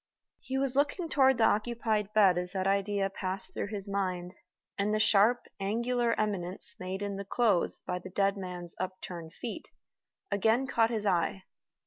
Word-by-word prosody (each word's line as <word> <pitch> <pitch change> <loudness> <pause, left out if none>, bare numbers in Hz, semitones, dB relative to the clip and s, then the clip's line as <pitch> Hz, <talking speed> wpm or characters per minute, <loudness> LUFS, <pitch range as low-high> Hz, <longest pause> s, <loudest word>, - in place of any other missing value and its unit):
He 265 - -4
was 270 -1 0
looking 295 +5 +1
toward 265 -4 +4
the 230 - +3
occupied 215 -1 +1
bed 200 -4 +5
as 180 0 -4
that 190 -1 -1
idea 200 0 +1
passed 190 -1 -4
through - - -3
his 205 -1 -3
mind, 185 -3 -2 0.4
and 200 +1 0
the 215 - +1
sharp, 220 +3 +4 0.2
angular 235 +4 0
eminence 195 -4 -2
made 185 +2 -4
in 200 -1 -3
the 200 - -4
clothes 200 -3 +1
by 180 0 -2
the 185 - -9
dead 195 +1 +1
man's 180 -3 -2
upturned 180 -3 -6
feet 245 - -6 0.6
again 225 +6 +2
caught 230 -4 +2
his 220 -3 -2
eye. 185 0 +1
200 Hz, 165 wpm, -30 LUFS, 185-230 Hz, 0.6 s, bed